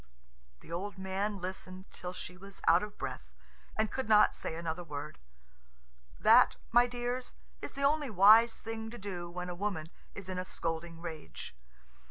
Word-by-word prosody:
The - - -13
old 195 +4 -4
man 190 +2 -2
listened 185 0 -6
till 180 - -6
she 180 0 -7
was 195 +1 -10
out - - +7
of 210 0 -6
breath - - -5 0.5
and 220 0 +1
could 265 -4 -3
not 210 -1 +7
say 160 - -4
another 170 +1 -3
word. 150 -1 -6 1.0
That, - - +7 0.2
my 240 +1 +6
dears, 245 +1 -3 0.3
is - - -6
the 275 - -4
only 290 0 +3
wise 220 +3 +7
thing 225 0 -5
to 240 - -8
do 180 -4 -5
when 180 +1 -5
a 180 - -4
woman 175 -4 -3 0.2
is 200 -2 -7
in 185 -1 -3
a - - -1
scolding 165 -1 -4
rage. 155 - -7
190 Hz, 170 wpm, -32 LUFS, 175-220 Hz, 1.0 s, out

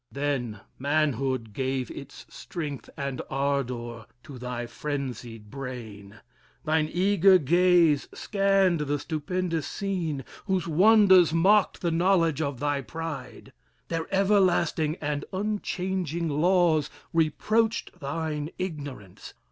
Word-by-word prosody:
Then 135 -7 -2 0.2
manhood 135 -5 0
gave 130 +1 -2
Its 140 0 -10
strength 150 -6 -6
and 140 -3 -3
ardor 125 -5 -2 0.2
to 135 -4 -10
thy 125 -1 -4
frenzied 120 -5 -5
brain; 110 -6 -8 0.4
Thine 155 0 +1
eager 195 +1 +5
gaze 175 -1 +4
scanned 195 -4 +2
the 145 -1 -1
stupendous 165 +2 -2
scene, 170 -9 -3 0.2
Whose 190 -3 0
wonders 185 -1 +6
mocked 195 +5 +3
the 170 - 0
knowledge 165 -3 +2
of 140 -5 -2
thy 145 0 0
pride. 135 -2 -7 0.4
Their 165 -1 -2
everlasting 185 -6 +2
and 145 -1 -2
unchanging 185 -4 -2
laws 160 -1 +3 0.2
Reproached 215 +8 +1
thine 150 +1 -3
ignorance. 145 - -7
155 Hz, 105 wpm, -27 LUFS, 135-180 Hz, 0.4 s, wonders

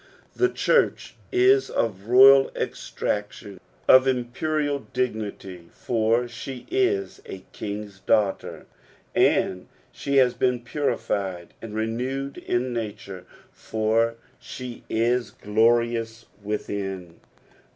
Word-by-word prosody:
The 370 - +3
church 470 - +1 0.2
is 390 +2 +4
of 100 -4 -2
royal 135 +2 +7
estmclion, 105 -2 -4 0.3
of 130 +1 +7
imperial 140 +4 -1
dignity, 105 -8 -4
fur 115 +1 0
she 125 +2 -8
is 390 +1 0
a 95 -1 -9
king's 100 -2 -6
daughter; 105 -1 0 0.5
and 90 -1 +2 0.2
she 140 0 -3
has 125 -2 +5
been 125 -1 0
purified 100 - -3
and 110 -2 -8
renewed 125 +5 -3
in 125 +1 -1
nature, 100 -5 -6 0.3
for 110 +1 0 0.2
she 125 -2 -8
is 120 +2 +1
glorious 115 +1 +1 0.2
within. 95 -4 -5
115 Hz, 100 wpm, -24 LUFS, 105-130 Hz, 0.5 s, royal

